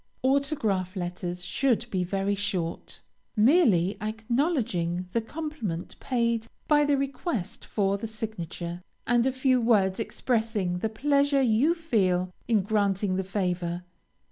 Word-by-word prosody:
AUTOGRAPH 260 - +1
LETTERS 180 0 -4
should 240 +3 +1
be 185 -2 0
very 195 +2 0
short; 195 -4 -3 0.3
merely 215 - +4
acknowledging 215 - -1
the 230 - +1
compliment 225 - -5
paid 235 -3 0 0.2
by 295 -1 +5
the 290 -1 +2
request 260 - -3
for 200 -1 0
the 225 - -4
signature, 180 -6 -5 0.2
and 240 +1 +3
a - - +2
few 260 -1 +2
words 205 -5 +3
expressing 220 -6 -1
the 220 - -1
pleasure 280 +4 +2
you 255 +8 +3
feel 185 - +1
in 220 -4 +3
granting 200 -2 +1
the 190 - 0
favor. 180 -2 -2
215 Hz, 125 wpm, -27 LUFS, 185-255 Hz, 0.3 s, by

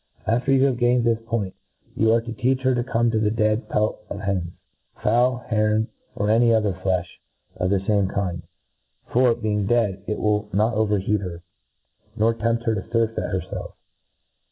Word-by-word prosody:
After 125 +4 +1
you 135 0 +4
have 130 -3 0
gained 120 0 +3
this 115 -1 +2
pointy 105 -5 -2 0.4
you 110 0 +3
arc 115 0 +2
to 115 - -5
teach 130 +2 0
her 130 0 +2
to 120 -1 0
come 120 -1 +1
to 110 - +1
the 105 -1 +2
dead 110 +1 0
pelt 105 +1 0
of 100 - -5
hens, 95 -4 -2 0.4
fowl, 120 +3 +1
heron, 110 -1 +1 0.3
or 105 - -1
any 115 +1 +4
other 105 -3 +2
flefh 95 -1 -1 0.5
of 90 - 0
the 100 0 +2
fame 100 -1 +1
kind; 90 -3 -2 0.7
for, 125 -1 +4
being 105 -3 -1
dead, 105 -5 +1
it 105 - -2
will 105 0 0
not 110 +4 +2
overheat 105 -1 +1
her, 85 -3 -7 0.7
nor 115 +1 +2
tempt 115 +1 -1
her 115 - +1
to 100 - -2
furfeit 115 +1 -1
herfelf. - - -4
110 Hz, 180 wpm, -23 LUFS, 100-115 Hz, 0.7 s, you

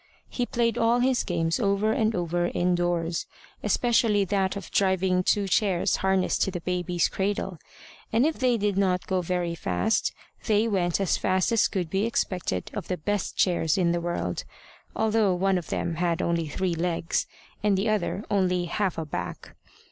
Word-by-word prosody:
He 245 -1 -2
played 235 -1 0
all 230 +1 +3
his 255 0 +2
games 165 -2 0
over 200 +2 +2
and 220 0 +1
over 175 0 0
indoors, 175 -2 0 0.3
especially 225 -4 +2
that 195 0 0
of 200 - -7
driving 190 -1 +2
two 200 +2 +1
chairs 190 -2 +2
harnessed 190 -1 +1
to - - +2
the 175 -2 -5
baby's 180 -1 0
cradle; 195 -3 -2 0.5
and 230 +4 +3
if 315 0 -1
they 250 -2 +3
did 205 -2 0
not 185 -2 +1
go 185 -1 0
very 175 -1 -1
fast, 90 - 0 0.4
they 215 +1 +3
went 180 -5 0
as 195 -3 +1
fast 185 +3 +1
as 230 -2 +4
could 180 -5 -3
be 195 +3 +1
expected 180 - -2
of - - -5
the 180 - -2
best 205 +5 -2
chairs 170 -3 +2
in 175 -3 +2
the 170 0 0
world, 170 - -2 0.5
although 220 -3 +2
one 190 +1 +2
of 170 - -11
them 170 - -1
had 170 0 0
only 170 -2 0
three 180 +4 -1
legs, 170 0 -1 0.3
and 205 -2 +2
the 200 +4 0
other 215 -1 -1
only 180 -3 +1
half 190 +1 -1
a 160 - -3
back. 150 - -6
185 Hz, 175 wpm, -26 LUFS, 175-205 Hz, 0.5 s, as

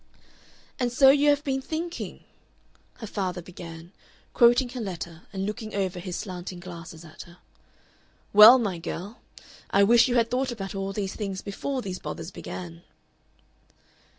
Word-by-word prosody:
"And 245 -1 0
so 270 +2 +7
you 290 +1 +4
have 290 0 +2
been 270 -2 -1
thinking?" 330 +5 -5 0.7
her 225 - -8
father 190 -3 -3
began, 170 -1 -10 0.4
quoting 240 +1 +5
her 250 0 -6
letter 170 -4 -7
and 195 -1 -3
looking 215 +1 -5
over 190 -2 -1
his 180 0 -5
slanting 180 -2 -6
glasses 170 -2 -10
at 155 - -12
her. 175 0 -16 1.0
"Well, 215 +5 +10
my 200 -8 -2
girl, 185 +6 -6 0.5
I 200 - +4
wish 235 +5 +6
you 250 - 0
had 230 -1 +2
thought 255 +1 0
about 195 -5 -6
all 195 0 -3
these 195 -1 -4
things 195 -3 -4
before 255 +6 -4
these 185 -2 -5
bothers - - -6
began." 85 -2 -8
200 Hz, 150 wpm, -26 LUFS, 180-245 Hz, 1.0 s, Well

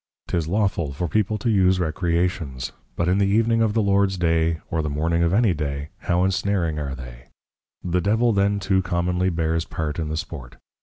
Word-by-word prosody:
'Tis 85 -3 -1
Lawful 95 -6 0
for 85 +5 -2
People 110 +4 0
to 115 +3 0
use 95 -2 +3
Recreations; 85 -4 -1 0.2
but 85 - 0
in 90 +2 +2
the 100 - +3
Evening 115 +3 +2
of 110 -1 +1
the 110 - +3
Lords 100 -1 +2
Day, 80 -1 +1
or 80 - +1
the 75 - -2
Morning 80 +4 0
of 85 0 +2
any 105 -1 +3
Day, 70 -2 -4
how 90 +1 +1
Ensnaring 95 -4 0
are 70 -2 -4
they! - - -10 0.6
The 90 0 0
Devil 110 +5 +2
then 100 0 +2
too 95 0 +1
commonly 90 0 0
bears 80 -1 0
part 80 -1 -4
in 80 -2 -2
the 80 - -2
Sport. 75 -8 -7
90 Hz, 195 wpm, -23 LUFS, 80-100 Hz, 0.6 s, use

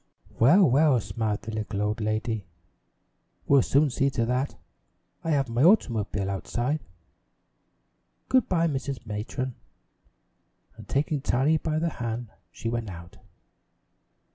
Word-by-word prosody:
"Well, 170 - +6
well," 140 0 +4
smiled 105 +1 -3
the 110 - -6
little 110 -1 -3
old 105 +2 -1
lady, 110 -1 -2 1.0
"we'll 140 -1 +5
soon 140 +3 +2
see 135 +3 +1
to 125 -4 -1
that. 125 +4 -1 0.7
I 165 - -3
have 140 -3 +2
my 115 +1 -1
automobile 115 - +3
outside. 120 - -2 1.5
Good 255 -3 +3
by, 170 -2 +2
Mrs. 135 -4 -4
Matron." 115 +5 -4 1.2
And - - -13
taking 145 +1 0
Tiny 140 +3 +2
by 155 0 -2
the 165 +1 +1
hand 120 -4 -4 0.2
she 115 - -6
went 115 -2 -2
out. 85 -1 -10
120 Hz, 125 wpm, -26 LUFS, 110-145 Hz, 1.5 s, Well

